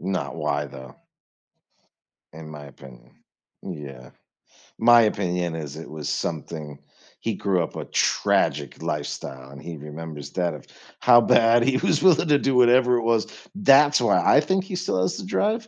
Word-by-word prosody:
Not 95 -2 -4
why 75 -2 -2
though 65 -2 -12 1.4
in 80 0 -11
my 75 -1 -10
opinion. 65 -3 -16 0.5
Yeah. 70 -4 -9 0.7
My 120 +1 +6
opinion 90 -5 -1
is 75 -3 -7
it 80 - -10
was 75 -1 -6
something 75 -2 -5 0.4
he 115 -2 -2
grew 95 -3 0
up 80 - -8
a - - -5
tragic 70 -1 0
lifestyle 70 -3 -6
and 70 - -12
he 85 -2 -8
remembers 75 -1 -9
that 90 -3 -2
of 75 - -11 0.4
how 120 -1 +6
bad 115 0 +4
he 130 +1 +1
was 150 +3 0
willing 175 -3 +4
to 145 -1 +4
do 135 -2 0
whatever 125 0 +4
it 120 - -3
was. 115 -1 +1 0.3
That's 150 -6 +5
why 120 - +2
I - - +5
think 190 +5 -1
he 195 - -6
still 180 - -2
has 95 - -1
the - - -7
drive 220 +3 -1
90 Hz, 165 wpm, -23 LUFS, 75-125 Hz, 1.4 s, My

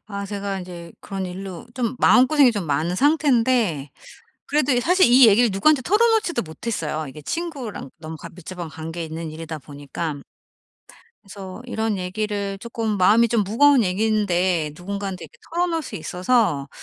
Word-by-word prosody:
아 200 -1 -5
제가 200 -1 -4
인제 175 -2 -9
그런 195 -1 -5
일로 185 +3 -7
좀 245 -1 -2
마음고생이 260 0 +5
좀 205 -4 -3
많은 155 +4 0
상태인데 245 - +2 0.6
그래도 290 -2 +1
이 245 - +2
사실 365 +7 +4
이 245 +1 +7
얘기를 225 +3 +5
누구한테 265 +9 +3
털어놓지도 425 - +2
못했어요. 160 -4 -4
이게 150 +3 -10
친구랑 275 - -5
너무 160 0 -8
과 - - -10
밀접한 175 -1 -8
관계 160 +2 -6
있는 160 0 -6
일이다 160 0 -7
보니까. 145 +1 -6 1.0
그래서 195 +2 -9
이런 220 -4 -2
얘기를 200 +1 -3
조금 225 -1 -3
마음이 215 +5 +5
좀 230 -2 +2
무거운 260 +5 +4
얘기인데 185 -5 +1
누군가한테 195 0 -5
이렇게 - - -16
털어놓을 335 -1 0
수 - - -7
있어서 180 - 0
200 Hz, 365 characters per minute, -22 LUFS, 170-245 Hz, 1.0 s, 이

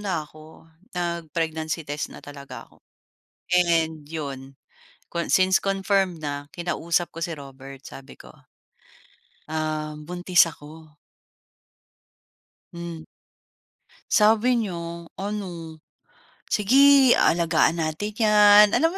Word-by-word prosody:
na 180 -7 -2
ako, 155 +1 -17 0.3
nag-pregnancy 165 -2 -3
test 145 +1 -4
na - - -10
talaga 140 -1 -10
ako - - -26 0.7
and 165 -3 +1
'yon 135 -4 -7 0.5
con 170 -1 -3
since 190 0 +3
confirmed 195 -2 0
na, 145 0 -5
kinausap 170 0 -1
ko 165 - -8
si 170 - -4
Robert. 135 -1 -12
Sabi 135 - -11
ko, - - -14 1.2
uhm, 155 -1 -4
"Buntis 180 0 +3
ako." 155 -1 -13 1.8
Hmm. 170 -2 -7 1.1
Sabi 225 +3 +4
nya 170 -4 -5
ano, 180 -6 -6 0.7
"Sige 270 +4 +5
alagaan 165 0 +2
natin 160 +7 -3
'yan." 210 -1 +6
Alam 330 +4 +2
170 Hz, 100 wpm, -24 LUFS, 155-195 Hz, 1.8 s, yan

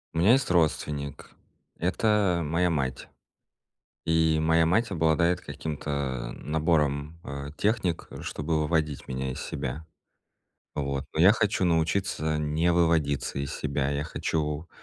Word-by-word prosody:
У - - +1
меня 100 +8 +6
есть 135 -6 +2
родственник. 75 -4 0 0.5
Это 95 0 +2
моя 85 +4 +1
мать. 70 -5 -2 1.0
И 80 -1 +3
моя 80 +1 +3
мать 110 +7 +2
обладает 85 0 +2
каким-то 70 -5 -4
набором, 75 -1 0
а, 70 +1 -6
техник, 100 -1 0
чтобы 75 +1 -2
выводить 75 -3 -1
меня 65 0 -3
из - - -7
себя. 70 +5 -5 0.9
Вот, 70 -1 -2
но 80 - +1
я 95 +5 +8
хочу 105 -4 +1
научиться 80 -2 +1
не 75 +3 +1
выводиться 80 -6 +1
из 70 0 -3
себя. 70 -1 -1
Я 70 +1 -1
хочу, 75 0 -2
80 Hz, 125 wpm, -27 LUFS, 70-85 Hz, 1.0 s, я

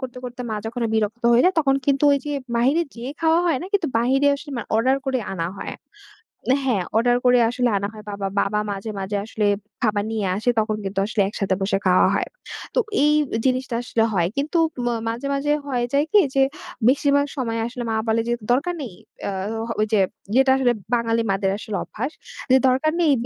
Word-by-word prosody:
করতে, 255 -1 -6
করতে 250 0 -6
মা 215 - -1
যখন 240 +2 -5
বিরক্ত 220 +2 -1
হয়ে 240 - +5
যায় 370 - +4
তখন 270 -3 +3
কিন্তু 280 +1 +2
ওই 280 - +3
যে 295 - -2 0.2
বাহিরে 275 +8 +3
যেয়ে 245 +3 -6
খাওয়া 325 +1 +4
হয় 325 - +2
না - - -5
কিন্তু 380 -7 +1
বাহিরে 265 +4 +2
আসলে 290 +1 -10
মানে - - -4
অর্ডার 260 +4 +3
করে 260 -1 +1 0.2
আনা 165 -1 -2
হয়। - - -5 0.9
হ্যাঁ। 210 -8 +1
অর্ডার 245 +1 +3
করে 250 0 +6
আসলে 245 0 +1
আনা 200 +1 -2
হয়। 215 -1 -11
বাবা 200 -1 -3
বাবা 210 +1 +1
মাঝে 200 +2 -5
মাঝে 200 +1 -2
আসলে 215 -1 -2 0.4
খাবার 210 -3 +1
নিয়ে 220 -2 -1
আসে 220 +4 0
তখন 215 0 0
কিন্তু 195 0 -2
আসলে 215 -1 0
একসাথে 195 -2 -1
বসে 195 0 +1
খাওয়া 185 0 +5
হয়। - - -1 0.5
তো - - +4 0.2
এই 300 0 +4 0.3
জিনিসটা 255 -1 0
আসলে 225 -1 +1
হয়। 175 -2 +2
কিন্তু 300 +4 0 0.3
ম - - 0 0.2
মাঝে 240 +5 -4
মাঝে 285 +1 0 0.2
হয়ে 245 -3 0
যায় 285 +2 +3
কি 420 - +7 0.2
যে, 270 - +4 0.5
বেশিরভাগ 285 +1 +3
সময় 230 -3 -1
আসলে 245 0 -6
মা - - 0
বলে 225 +1 +2
যে - - +2 0.2
দরকার 335 +8 +1
নেই। 230 -9 -6 0.3
ইয়া 200 - -2 0.2
এ - - -3 0.3
ওই 215 - +3 0.5
ইয়েটা 265 +1 +5
আসলে 245 -2 +3 0.2
বাঙালি 230 -1 +1
মাদের 195 0 0
আসলে 210 -1 -4
অভ্যাস। 255 +7 -5 0.4
যে 260 - +8
দরকার 265 +5 +2
নেই 315 - +4
245 Hz, 200 wpm, -22 LUFS, 215-275 Hz, 0.9 s, যে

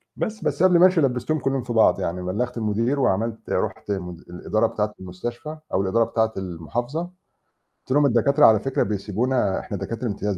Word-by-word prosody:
بس 220 0 -4
بس 180 - 0
قبل 180 -2 +5
ما 180 - +8
أمشي 180 -3 +4
لبّستهم 135 +3 0
كلّهم 135 -1 -1
في 120 -1 -4
بعض، 110 - +4
يعني 90 +2 -3
بلّغت 120 +7 -2
المدير 115 +6 0
وعملت 115 -1 -1
رُحت 105 - -2
م 90 -3 -3 0.2
الإدارة 110 +5 0
بتاعة 105 -1 -2
المستشفى 120 - -6 0.2
أو 95 - +2
الإدارة 110 +5 +2
بتاعة 110 -1 0
المحافظة، 95 - -4
قُلت 180 +1 -11 0.6
لهم: 145 +1 +4
"الدكاترة 140 +4 +4
على 110 -2 +6
فكرة 135 +3 0
بيسيبونا 105 +2 -1
إحنا - - -5
دكاترة 115 +1 -4
امتياز، 100 -2 -2
115 Hz, 180 wpm, -23 LUFS, 100-135 Hz, 0.6 s, ما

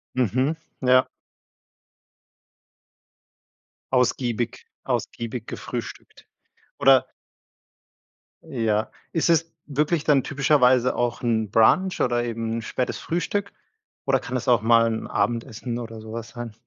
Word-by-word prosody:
Mhm, 130 - +1 0.3
ja. 130 0 +4 2.9
Ausgiebig 120 -2 0 0.2
ausgiebig 115 0 -3
gefrühstückt. - - -7 0.5
Oder 135 -2 +5 1.4
Ja, 110 -7 -1 0.2
ist 165 0 +1
es 165 0 +2
wirklich 150 +3 0
dann 140 -4 +3
typischerweise 130 -4 +3
auch 120 -1 -1
'n 110 -3 0
Brunch 180 - +3
oder 120 -1 +1
eben 115 -1 -3
'n - - -3
spätes 125 +2 -3
Frühstück 200 +4 -2 0.5
oder - - +3
kann 125 - -6
es 125 +1 -3
auch 120 -3 +5
mal 115 0 +5
'n 110 -1 -3
Abendessen 115 +1 -2
oder 115 -2 -7
sowas 115 +1 -7
sein? 120 -3 -7
120 Hz, 110 wpm, -24 LUFS, 115-135 Hz, 2.9 s, Oder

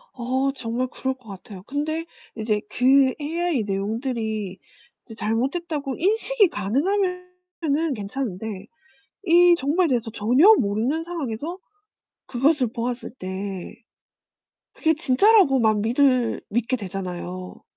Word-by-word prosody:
어 260 +2 0
정말 250 0 -2
그럴 260 +1 -3
것 255 -3 -23
같아요. 195 -1 -10
근데 305 +7 -3 0.3
이제 215 -1 0
그 260 +1 +4
AI 320 -3 -1
내용들이 215 -1 -3 0.5
이제 225 - -11
잘못됐다고 270 +6 -2
인식이 435 +2 +2
가능하면은 360 - -1
괜찮은데 210 -2 -5 0.6
이 350 0 +6
정보에 330 +5 +1
대해서 235 -5 -1
전혀 255 - +5
모르는 235 +10 0
상황에서 325 -1 -4 0.7
그것을 270 +2 +2
보았을 240 +1 -3
때 190 -2 -6 1.0
그게 320 0 +1
진짜라고 315 - +4
막 215 -2 +3
믿을 250 +1 +2
믿게 240 +4 0
되잖아요. 185 -3 -6
255 Hz, 260 characters per minute, -23 LUFS, 215-320 Hz, 1.0 s, 이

